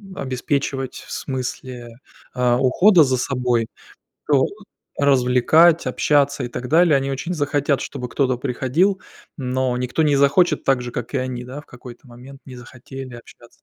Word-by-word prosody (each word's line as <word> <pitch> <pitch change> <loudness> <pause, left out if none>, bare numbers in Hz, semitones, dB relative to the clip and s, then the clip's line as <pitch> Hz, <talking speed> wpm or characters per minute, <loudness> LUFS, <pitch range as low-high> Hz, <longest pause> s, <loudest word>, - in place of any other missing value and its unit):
обеспечивать 135 0 -3
в - - -12
смысле, 125 -3 -6 0.4
а, 125 -1 +2
ухода 170 +7 +5
за 130 -2 0
собой, 125 -3 -1 0.6
то 140 -3 +3 0.5
развлекать, 140 +5 +4
общаться 140 -2 +1
и - - -4
так 125 +1 -7
далее, 165 -1 +4
они 135 0 0
очень 135 +6 -4
захотят, 145 -2 0
чтобы 125 -3 -6
кто-то 130 -1 0
приходил, 140 +10 0 0.3
но 130 -2 -2
никто 125 +5 -1
не 145 -2 +3
захочет, 140 +6 +3
так 135 -2 +2
же, 120 - -6
как 120 +1 -6
и 140 - +1
они, 130 -1 -4
да, 130 +4 -8
в 150 - -14
какой-то 125 +1 -13
момент 125 +3 -13
не 130 - -10
захотели 130 +1 -10
общаться. 120 0 -15
130 Hz, 155 wpm, -21 LUFS, 125-140 Hz, 0.6 s, ухода